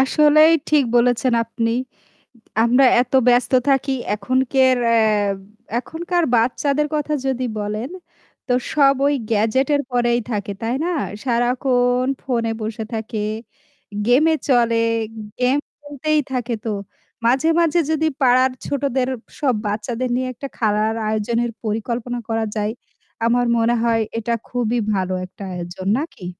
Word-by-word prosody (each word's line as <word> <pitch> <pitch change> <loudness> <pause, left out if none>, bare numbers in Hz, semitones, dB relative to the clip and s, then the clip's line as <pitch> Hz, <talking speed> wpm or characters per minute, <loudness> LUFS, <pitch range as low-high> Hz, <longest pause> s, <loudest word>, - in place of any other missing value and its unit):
আসলেই 305 +3 +5 0.2
ঠিক 295 -3 +4
বলেছেন 245 +1 +2
আপনি। 230 0 -2 0.9
আমরা 250 +3 +4 0.2
এত 250 - -5
ব্যস্ত 245 +1 +3 0.2
থাকি 270 0 +2 0.2
এখন 215 +5 -1 0.2
কার 260 -1 +4
আ - - +3
আর 210 -3 +2 0.4
এখনকার 345 +5 -2
বাচ্চাদের 280 +5 +1
কথা 300 0 -1
যদি 255 -1 -1
বলেন, 210 +5 -3 0.6
তো 250 - +1 0.2
সব 275 -2 +5
ওই 290 - +2 0.2
গ্যাজেটের 260 +7 +2
পরেই 240 -1 +2
থাকে 205 -1 -3
তাই 230 +2 -1
না? - - 0 0.3
সারাক্ষণ 245 0 +1
ফোনে 230 -4 -1
বসে 220 +1 -4
থাকে, 220 0 -4 0.9
গেমে 285 +7 +4 0.2
চলে 235 -3 +3 0.6
গেম 255 +2 +3 0.2
খেলতেই 295 +1 -1
থাকে। 245 -2 -2
তো - - -1 0.6
মাঝে, 260 +6 +3
মাঝে 335 0 +3
যদি 315 0 +1
পাড়ার 255 0 +4
ছোটদের 270 -2 -1 0.3
সব 275 -4 +2
বাচ্চাদের 230 +4 -2
নিয়ে 255 +1 -1
একটা 275 +4 -7
খেলার 215 0 +1
আয়োজনের 230 +2 -1
পরিকল্পনা 235 +3 -3
করা 225 0 0
যায়, 210 0 -1 0.5
আমার 245 +1 +2
মনে 230 +1 +2
হয় 230 -1 +2 0.2
এটা 230 +1 -1 0.2
খুবই 245 -1 0
ভালো 185 -1 -1
একটা 185 +2 -12
আয়োজন, 180 +2 -6
নাকি? 290 - -7
245 Hz, 130 wpm, -20 LUFS, 225-270 Hz, 0.9 s, আসলেই